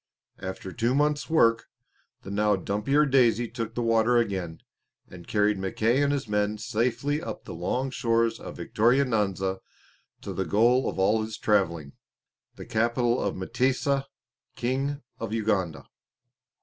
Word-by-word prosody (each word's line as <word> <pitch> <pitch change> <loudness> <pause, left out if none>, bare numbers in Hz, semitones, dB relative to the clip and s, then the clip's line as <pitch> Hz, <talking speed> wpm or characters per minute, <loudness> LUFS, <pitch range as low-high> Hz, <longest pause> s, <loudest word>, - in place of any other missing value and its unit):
After 95 0 -6
two 120 +7 0
months' 150 +1 +1
work 115 -8 +3 0.6
the 100 - -7
now 105 0 +2
dumpier 105 - +1
Daisy 120 -4 +3
took 115 -1 -5
the 120 - -1
water 115 +1 +3
again, 95 -8 -1 0.5
and 85 -1 -12
carried 105 -1 +1
Mackay 110 +7 +1
and 145 0 +2
his 140 -4 -2
men 105 0 0
safely 125 +7 -1
up 110 - -6
the - - -7
long 125 +11 -2
shores 115 -2 +1
of - - -9
Victoria 120 +6 +2
Nyanza 95 -5 -1 0.6
to - - -6
the 95 - -1
goal 120 +9 +3
of - - -6
all 105 +4 +3
his 110 0 -5
travelling, 85 -9 0 0.6
the - - -9
capital 120 +1 +1
of 100 - -1
M'tesa, 130 +6 0 0.5
King 135 +4 -2 0.2
of 110 -1 -4
Uganda. 100 -7 -1
115 Hz, 145 wpm, -26 LUFS, 100-125 Hz, 0.6 s, work